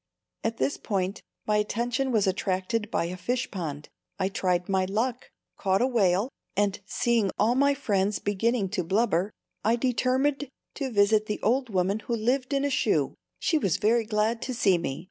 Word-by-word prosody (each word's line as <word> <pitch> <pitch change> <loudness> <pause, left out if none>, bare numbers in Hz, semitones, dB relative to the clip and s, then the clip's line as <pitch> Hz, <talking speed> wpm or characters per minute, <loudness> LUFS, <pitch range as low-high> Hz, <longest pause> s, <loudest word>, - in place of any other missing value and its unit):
"] - - -54
At 225 0 -1
this 285 - 0
point 195 -2 -2 0.2
my 210 0 +2
attention 240 +5 0
was 215 -4 +3
attracted 190 +3 -1
by 170 - 0
a 175 +2 -4
fish 250 +7 -2
pond. 155 -6 -5 0.3
I 190 -1 0
tried 180 -2 0
my 190 -1 +1
luck, 230 +6 -2 0.3
caught 190 0 +2
a 245 - +3
whale, 205 -5 +2 0.3
and 205 -1 +1
seeing 230 -3 +1
all 220 +4 +3
my 280 +2 +3
friends 205 -6 0
beginning 205 +1 0
to 185 -2 -1
blubber, 195 0 +1 0.3
I 225 +2 +3
determined 260 +3 +1 0.2
to 275 -2 -3
visit 215 -1 +3
the 210 - -2
old 250 +3 +2
woman 195 +1 +1
who 235 +2 -2
lived 255 +4 0
in 280 0 +1
a 285 - 0
shoe. 260 - +1 0.2
She 315 - +1
was 195 - +1
very 225 +3 +2
glad 220 +2 0
to 255 - -3
see 195 -6 +3
me. 135 -5 -3
215 Hz, 185 wpm, -27 LUFS, 195-245 Hz, 0.3 s, was